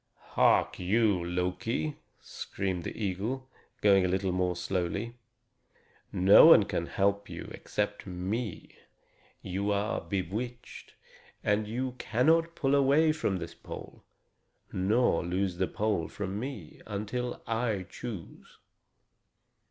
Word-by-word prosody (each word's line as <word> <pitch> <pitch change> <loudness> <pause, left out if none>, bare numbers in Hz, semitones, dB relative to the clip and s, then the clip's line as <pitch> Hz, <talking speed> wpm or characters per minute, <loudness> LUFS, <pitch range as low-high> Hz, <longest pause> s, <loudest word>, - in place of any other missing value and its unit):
"Hark - - +3
you, 100 0 +2
Loki," 90 - -2 0.2
screamed 95 -3 -4
the - - -5
eagle, 110 +8 -2 0.3
going 100 -2 +5
a - - +2
little 95 +1 0
more 90 0 0
slowly; 95 +6 -2 1.0
"no 95 - +8
one 165 -10 +9
can 85 -4 -2
help 100 +1 0
you - - -7
except 105 0 -3
me. 95 +4 -4 0.7
You 100 +3 -2
are 100 +1 0
bewitched, 105 +6 -5 0.5
and 105 +1 +1
you 125 +4 -2
cannot 165 +8 +2
pull 135 -2 +1
away 140 +3 +4
from 105 -11 -1
this - - -6
pole, - - -10 0.7
nor 100 +1 +2
loose 90 +1 -1
the 95 0 +1
pole 105 -6 -1
from 100 0 -4
me, 120 - -7
until 110 +4 -3
I 115 -4 -1
choose. 110 -9 -9
100 Hz, 115 wpm, -30 LUFS, 95-120 Hz, 1.0 s, one